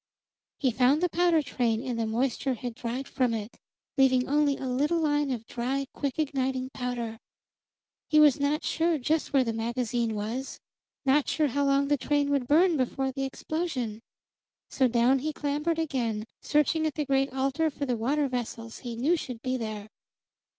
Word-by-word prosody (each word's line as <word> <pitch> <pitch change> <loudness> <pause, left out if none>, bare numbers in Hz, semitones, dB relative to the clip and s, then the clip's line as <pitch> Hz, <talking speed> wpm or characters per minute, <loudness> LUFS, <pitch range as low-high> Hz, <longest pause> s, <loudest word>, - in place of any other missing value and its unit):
He 260 -4 +1
found 260 +5 +3
the 360 - +3
powder 340 -3 +3
train, 235 -4 0
and 245 -3 -2
the 225 - 0
moisture 255 +3 0
had 245 +1 -5
dried 245 +3 -4
from 245 -3 0
it, 215 +1 -6 0.4
leaving 260 -1 +4
only 290 0 +2
a - - -5
little 290 +7 +1
line 295 -2 +1
of 235 -4 -3
dry, 260 +4 -2
quick 280 -2 -3
igniting 265 -3 -1
powder. 240 -3 -4 0.9
He 305 - +5
was 295 -3 +6
not 285 +2 0
sure 330 0 +1
just 305 +4 0
where 270 -2 +4
the 230 -2 -2
magazine 235 0 -1
was; 225 +6 -4 0.5
not 275 +2 +3
sure 305 -2 +1
how 280 +3 0
long 275 0 +3
the 290 0 +2
train 285 +1 0
would 275 -3 +1
burn 330 +3 +4
before 265 +1 -1
the 270 +1 -3
explosion. 265 -6 -3 0.7
So 260 - +3
down 245 +3 +3
he 310 +4 -2
clambered 300 +3 -1
again, 240 -9 -1 0.2
searching 310 +2 +2
at 305 - -4
the 300 - -1
great 270 0 +1
altar 275 +4 0
for 285 -1 -4
the 250 -3 0
water 275 +6 +1
vessels 230 -2 -5
he 240 -2 -6
knew 280 +9 +2
should 250 -8 -6
be 255 -1 0
there. 215 -4 -4
265 Hz, 180 wpm, -28 LUFS, 240-295 Hz, 0.9 s, was